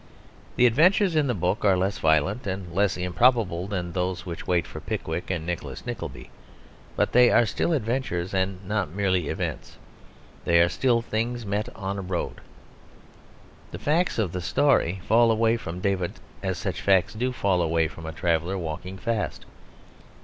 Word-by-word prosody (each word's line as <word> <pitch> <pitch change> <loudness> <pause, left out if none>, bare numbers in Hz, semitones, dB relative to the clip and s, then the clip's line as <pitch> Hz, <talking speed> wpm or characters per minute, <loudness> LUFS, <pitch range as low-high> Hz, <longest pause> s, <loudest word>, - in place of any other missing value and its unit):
The 125 - +4
adventures 170 - +4
in 150 -2 +3
the 125 - 0
book 90 +2 -1
are 95 -3 +4
less 95 +1 -1
violent 80 - +1
and 95 -3 -4
less 100 +1 +1
improbable 90 0 +2
than 90 -4 -3
those 90 0 -2
which 85 -2 -7
wait 90 -3 +2
for - - -8
Pickwick - - -4
and 90 -4 -2
Nicholas 85 -1 -5
Nickleby; - - -6 0.6
but - - +1
they 125 0 +6
are 120 - +5
still 115 - -1
adventures 115 - -1
and 95 0 -2
not 100 -5 -1
merely 95 -2 0
events; - - -4 0.7
they 85 0 +4
are 85 0 +5
still 120 0 +1
things 115 +1 -2
met 105 +3 -2
on 100 +1 -4
a - - -3
road. 90 -2 -4 1.3
The - - -7
facts 165 +5 +1
of 105 -7 0
the 90 - -4
story 95 - +2
fall 115 +2 +5
away 115 +1 +3
from 90 -6 -6
David 95 -3 0 0.3
as 95 -2 -2
such 95 -1 -3
facts 95 -2 +3
do 125 +4 -1
fall 95 -7 +1
away 80 -1 +2
from 80 0 -10
a - - -4
traveller 85 +3 0
walking 90 +2 -5
fast. 115 0 -3
95 Hz, 170 wpm, -25 LUFS, 90-115 Hz, 1.3 s, they